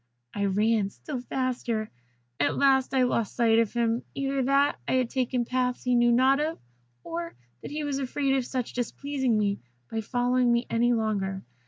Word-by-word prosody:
I 200 Hz, 0 st, -1 dB
ran 210 Hz, +1 st, +2 dB
still 260 Hz, +5 st, -6 dB
faster. 245 Hz, -4 st, -2 dB, 0.5 s
At 145 Hz, -, +1 dB
last 265 Hz, -1 st, +3 dB
I 265 Hz, -1 st, +3 dB
lost 230 Hz, -3 st, 0 dB
sight 230 Hz, -2 st, +4 dB
of 230 Hz, -3 st, +1 dB
him, 235 Hz, 0 st, 0 dB
either 275 Hz, 0 st, -1 dB
that 275 Hz, +2 st, +2 dB
I -, -, 0 dB
had 255 Hz, -2 st, +1 dB
taken 250 Hz, -2 st, 0 dB
paths 250 Hz, 0 st, -1 dB
he 250 Hz, -, +1 dB
knew 240 Hz, 0 st, +4 dB
not 260 Hz, +3 st, +4 dB
of, 310 Hz, +2 st, -1 dB, 0.5 s
or 170 Hz, -3 st, -5 dB, 0.3 s
that -, -, -7 dB
he 300 Hz, +1 st, -4 dB
was 285 Hz, -2 st, -2 dB
afraid 275 Hz, +1 st, 0 dB
of 260 Hz, -2 st, -1 dB, 0.2 s
displeasing 260 Hz, 0 st, -1 dB
me 200 Hz, -1 st, 0 dB, 0.3 s
by 225 Hz, -, -1 dB
following 245 Hz, +2 st, +1 dB
me 235 Hz, 0 st, +2 dB
any 240 Hz, +1 st, +3 dB
longer. 200 Hz, -4 st, -1 dB
245 Hz, 175 wpm, -27 LUFS, 225-265 Hz, 0.5 s, sight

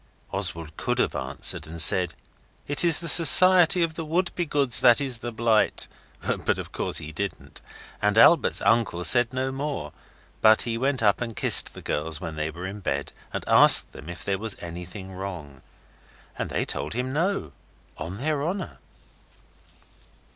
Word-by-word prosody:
Oswald 80 Hz, -2 st, -4 dB
could -, -, -4 dB
have -, -, -1 dB
answered 75 Hz, -, -2 dB
and 85 Hz, +1 st, -9 dB
said, 85 Hz, +2 st, +3 dB, 0.5 s
'It 145 Hz, +3 st, +1 dB
is 170 Hz, -2 st, +4 dB
the 170 Hz, -, -7 dB
Society 180 Hz, +2 st, +7 dB
of 165 Hz, -1 st, -3 dB
the 165 Hz, -, -7 dB
Wouldbegoods 160 Hz, -5 st, -1 dB
that 120 Hz, +1 st, +4 dB
is 130 Hz, -4 st, -2 dB
the 120 Hz, 0 st, -7 dB
blight,' 115 Hz, -1 st, -1 dB, 0.5 s
but -, -, -2 dB
of -, -, -9 dB
course -, -, -3 dB
he 75 Hz, -, -6 dB
didn't 100 Hz, +5 st, -8 dB, 0.4 s
and 105 Hz, 0 st, -1 dB
Albert's 160 Hz, +7 st, +3 dB
uncle 100 Hz, -4 st, -1 dB
said 120 Hz, +4 st, +2 dB
no 130 Hz, +1 st, -4 dB
more, 135 Hz, -, -7 dB, 0.5 s
but 110 Hz, 0 st, +4 dB
he 115 Hz, -1 st, -4 dB
went 130 Hz, +1 st, -3 dB
up 100 Hz, +1 st, 0 dB
and 115 Hz, -2 st, -6 dB
kissed -, -, +5 dB
the -, -, -12 dB
girls 75 Hz, +1 st, -3 dB
when 80 Hz, -3 st, -8 dB
they 75 Hz, 0 st, -4 dB
were 85 Hz, +3 st, -10 dB
in 100 Hz, +2 st, -8 dB
bed, 70 Hz, -7 st, -5 dB, 0.2 s
and -, -, -6 dB
asked -, -, +6 dB
them 70 Hz, +5 st, -13 dB
if 85 Hz, -, -10 dB
there 100 Hz, -1 st, -3 dB
was 110 Hz, -1 st, -3 dB
anything 90 Hz, +3 st, -10 dB
wrong. 85 Hz, -8 st, -10 dB, 0.7 s
And -, -, -6 dB
they -, -, -4 dB
told -, -, -6 dB
him 125 Hz, +2 st, -5 dB
no, 185 Hz, +7 st, -3 dB, 0.4 s
on 85 Hz, +5 st, -8 dB
their 145 Hz, +3 st, -3 dB
honour. 185 Hz, +4 st, -6 dB
115 Hz, 170 wpm, -23 LUFS, 85-145 Hz, 0.7 s, Society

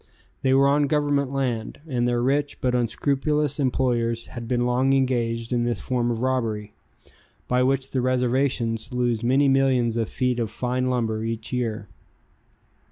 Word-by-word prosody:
They 130 Hz, 0 st, +3 dB
were 140 Hz, +1 st, +5 dB
on 145 Hz, +1 st, +3 dB
Government 145 Hz, -2 st, +1 dB
land, 125 Hz, -5 st, -2 dB
and 120 Hz, -4 st, 0 dB
their 120 Hz, 0 st, +1 dB
rich 140 Hz, +2 st, 0 dB
but 125 Hz, -1 st, 0 dB
unscrupulous 140 Hz, +5 st, 0 dB
employers 120 Hz, -3 st, 0 dB
had 120 Hz, -2 st, -8 dB
been 120 Hz, 0 st, 0 dB
long 130 Hz, +2 st, +2 dB
engaged 120 Hz, -3 st, 0 dB
in 120 Hz, -1 st, +1 dB
this 120 Hz, 0 st, -1 dB
form 120 Hz, -2 st, -1 dB
of 115 Hz, -1 st, -2 dB
robbery, 110 Hz, -5 st, -1 dB, 0.7 s
by 125 Hz, 0 st, +2 dB
which 135 Hz, +1 st, +1 dB
the 130 Hz, -, 0 dB
reservations 125 Hz, -2 st, 0 dB
lose 120 Hz, -3 st, 0 dB
many 135 Hz, +4 st, +3 dB
millions 130 Hz, -4 st, +2 dB
of 115 Hz, -2 st, -1 dB
feet 125 Hz, -1 st, -1 dB
of 115 Hz, -2 st, -1 dB
fine 125 Hz, +2 st, -2 dB
lumber 115 Hz, -3 st, 0 dB
every 115 Hz, 0 st, -3 dB
year. 115 Hz, -4 st, -2 dB
125 Hz, 160 wpm, -24 LUFS, 115-135 Hz, 0.7 s, were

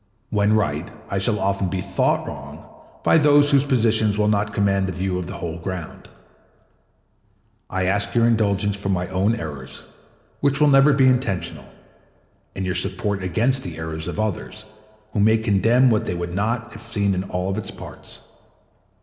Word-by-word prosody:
When 105 Hz, 0 st, +2 dB
right, 85 Hz, -7 st, 0 dB, 0.2 s
I 100 Hz, -, 0 dB
shall 105 Hz, +2 st, +1 dB
often 100 Hz, -1 st, 0 dB
be 95 Hz, -, -2 dB
thought 95 Hz, +1 st, 0 dB
wrong -, -, -9 dB, 0.4 s
by 160 Hz, -, +5 dB
those 145 Hz, -1 st, +5 dB
whose 140 Hz, -1 st, +4 dB
positions 110 Hz, -6 st, +2 dB
will 105 Hz, 0 st, +2 dB
not 105 Hz, 0 st, 0 dB
command 100 Hz, -2 st, +1 dB
a -, -, -2 dB
view 90 Hz, 0 st, -2 dB
of 90 Hz, -, -5 dB
the 95 Hz, -, -6 dB
whole 85 Hz, -1 st, -5 dB
ground. 90 Hz, -1 st, -7 dB, 1.6 s
I 95 Hz, 0 st, -1 dB
ask 100 Hz, +4 st, +1 dB
your 115 Hz, -1 st, +4 dB
indulgence 105 Hz, -3 st, +1 dB
for 100 Hz, -1 st, -5 dB
my 90 Hz, -2 st, 0 dB
own 100 Hz, +5 st, +1 dB
errors, 75 Hz, -, -7 dB, 0.6 s
which 140 Hz, -1 st, +1 dB
will 150 Hz, -1 st, +5 dB
never 135 Hz, +1 st, +6 dB
be 135 Hz, -1 st, +4 dB
intentional, 125 Hz, -8 st, -1 dB, 0.9 s
and 95 Hz, -, -3 dB
your 90 Hz, -, -1 dB
support 100 Hz, +1 st, -2 dB
against 120 Hz, +8 st, +1 dB
the 85 Hz, -3 st, -6 dB
errors 80 Hz, 0 st, -5 dB
of -, -, -5 dB
others, 110 Hz, +1 st, -4 dB, 0.5 s
who -, -, -1 dB
may 110 Hz, +2 st, +4 dB
condemn 115 Hz, +4 st, +3 dB
what 110 Hz, -, 0 dB
they 90 Hz, -, -2 dB
would 85 Hz, 0 st, -4 dB
not 115 Hz, +4 st, -2 dB
if 110 Hz, -, -10 dB
seen 105 Hz, -4 st, -1 dB
in 90 Hz, 0 st, -2 dB
all 95 Hz, 0 st, -3 dB
its 110 Hz, -1 st, -5 dB
parts. -, -, -11 dB
100 Hz, 175 wpm, -22 LUFS, 95-115 Hz, 1.6 s, never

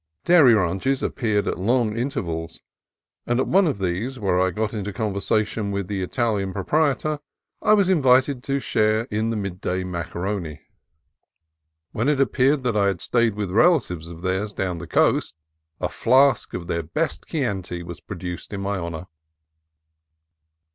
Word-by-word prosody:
Dairy 150 Hz, -9 st, +7 dB
ranches 95 Hz, +8 st, 0 dB
appeared 110 Hz, -5 st, 0 dB
at -, -, -2 dB
long 115 Hz, +2 st, +1 dB
intervals, 85 Hz, -10 st, -3 dB, 0.7 s
and 120 Hz, +1 st, +1 dB
at -, -, +2 dB
one 190 Hz, 0 st, +4 dB
of 145 Hz, -, -1 dB
these, 95 Hz, +8 st, -2 dB
where 95 Hz, -5 st, +1 dB
I 95 Hz, -, +3 dB
got 105 Hz, +4 st, -2 dB
into 105 Hz, -2 st, -3 dB
conversation 105 Hz, +1 st, -1 dB
with 100 Hz, -1 st, -2 dB
the 100 Hz, +1 st, -3 dB
Italian 100 Hz, -1 st, -1 dB
proprietor, 150 Hz, -, 0 dB, 0.4 s
I 215 Hz, -, +4 dB
was 200 Hz, -3 st, +4 dB
invited 130 Hz, -6 st, +3 dB
to 140 Hz, 0 st, 0 dB
share 110 Hz, -3 st, +1 dB
in 110 Hz, +2 st, 0 dB
the 115 Hz, -, -1 dB
midday 95 Hz, -2 st, -3 dB
macaroni. 85 Hz, -2 st, -4 dB, 1.3 s
When 115 Hz, +6 st, 0 dB
it 150 Hz, -2 st, +1 dB
appeared 135 Hz, +1 st, +2 dB
that 120 Hz, -4 st, 0 dB
I 100 Hz, -1 st, +3 dB
had 95 Hz, -3 st, -1 dB
stayed 115 Hz, 0 st, +1 dB
with 100 Hz, -3 st, -3 dB
relatives 110 Hz, -, +2 dB
of 85 Hz, 0 st, -10 dB
theirs 95 Hz, +3 st, -1 dB
down 90 Hz, -4 st, -2 dB
the -, -, -8 dB
coast, -, -, +2 dB, 0.4 s
a -, -, 0 dB
flask 130 Hz, +2 st, +3 dB
of 90 Hz, -, -5 dB
their 85 Hz, 0 st, -1 dB
best 155 Hz, -, -3 dB
Chianti 95 Hz, -, -3 dB
was 85 Hz, 0 st, -8 dB
pro 100 Hz, -, -8 dB
duced 90 Hz, +2 st, -6 dB
in 100 Hz, -, -4 dB
my 100 Hz, 0 st, -2 dB
honor. 85 Hz, 0 st, -5 dB
105 Hz, 160 wpm, -23 LUFS, 90-130 Hz, 1.3 s, Dairy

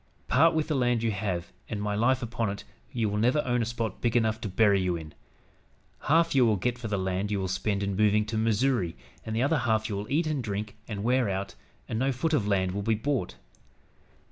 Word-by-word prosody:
Part 165 Hz, 0 st, +4 dB
with 155 Hz, -1 st, 0 dB
the 155 Hz, -, 0 dB
land 120 Hz, -4 st, +1 dB
you 115 Hz, -, +1 dB
have 95 Hz, -4 st, -3 dB, 0.2 s
and, 105 Hz, -, -3 dB
my 105 Hz, 0 st, -1 dB
life 125 Hz, +5 st, +2 dB
upon 115 Hz, -1 st, -2 dB
it, 100 Hz, +1 st, -5 dB, 0.3 s
you 115 Hz, -3 st, 0 dB
will 105 Hz, 0 st, -1 dB
never 125 Hz, +7 st, +3 dB
own 120 Hz, -1 st, +1 dB
a -, -, 0 dB
spot 115 Hz, -3 st, -4 dB
big 120 Hz, 0 st, +2 dB
enough 110 Hz, -1 st, +1 dB
to 105 Hz, -, -3 dB
bury 100 Hz, 0 st, +3 dB
you 90 Hz, -1 st, 0 dB
in. 80 Hz, -2 st, -8 dB, 0.9 s
Half 165 Hz, +3 st, +3 dB
you 135 Hz, -2 st, +5 dB
will 110 Hz, -3 st, +4 dB
get 125 Hz, +5 st, -1 dB
for 115 Hz, -, -4 dB
the 105 Hz, -2 st, -1 dB
land 95 Hz, +1 st, -1 dB
you 105 Hz, -2 st, 0 dB
will 95 Hz, -, -1 dB
spend 100 Hz, +2 st, -1 dB
in 100 Hz, -1 st, -1 dB
moving 105 Hz, +1 st, +3 dB
to 110 Hz, +1 st, -4 dB
Missouri, 110 Hz, -, +1 dB, 0.3 s
and 110 Hz, -1 st, -4 dB
the 115 Hz, -, +2 dB
other 150 Hz, +2 st, +2 dB
half 110 Hz, -2 st, +1 dB
you 105 Hz, -, -2 dB
will 105 Hz, +5 st, -5 dB
eat 160 Hz, +4 st, +2 dB
and 150 Hz, -4 st, -1 dB
drink 105 Hz, 0 st, -4 dB
and 105 Hz, -3 st, -4 dB
wear 125 Hz, -1 st, +2 dB
out, 95 Hz, +1 st, -3 dB, 0.3 s
and 110 Hz, -, -2 dB
no 135 Hz, +2 st, +2 dB
foot 145 Hz, +6 st, -1 dB
of 110 Hz, -9 st, +2 dB
land 95 Hz, -2 st, +1 dB
will 100 Hz, +2 st, -3 dB
be 110 Hz, +2 st, +1 dB
bought. 115 Hz, -, -2 dB
110 Hz, 240 wpm, -28 LUFS, 100-125 Hz, 0.9 s, you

